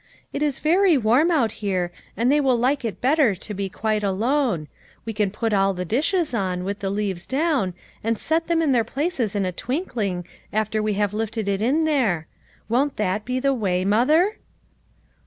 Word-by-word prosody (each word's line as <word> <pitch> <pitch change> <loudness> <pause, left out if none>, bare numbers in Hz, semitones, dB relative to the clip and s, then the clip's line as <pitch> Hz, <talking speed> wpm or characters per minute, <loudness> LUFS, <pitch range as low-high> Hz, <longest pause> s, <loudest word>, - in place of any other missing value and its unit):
" - - -38
It 280 - -3
is 290 -3 +1
very 350 +1 +4
warm 250 +8 +3
out 265 -11 +2
here, 185 -4 -1 0.3
and 235 +4 +2
they 295 +1 +4
will 260 -3 +3
like 260 +4 +1
it 225 -3 -4
better 265 -5 +3
to 210 +3 -7
be 200 -1 -3
quite 215 +2 -1
alone; 210 - 0 0.4
we 225 - -3
can 210 -1 +1
put 220 +2 -2
all 195 -1 +2
the 180 0 -3
dishes 305 - 0
on, 185 -5 -1
with 200 +2 -3
the 195 - -2
leaves 195 -3 -2
down, 270 - 0 0.3
and 225 +1 0
set 325 +7 0
them 330 -1 +2
in 295 - +2
their 240 -3 +3
places 260 - -2
in 200 -2 +1
a 185 - -1
twinkling, 210 - -3 0.3
after 215 0 0
we 215 0 0
have 205 0 0
lifted 220 0 -2
it 200 0 0
in 275 +8 +2
there. 230 - +1 0.4
Won't 270 +5 +1
that 210 0 -1
be 255 +1 -1
the 275 +1 +2
way, 185 -7 0
mother 305 - +3
225 Hz, 195 wpm, -23 LUFS, 200-280 Hz, 0.4 s, very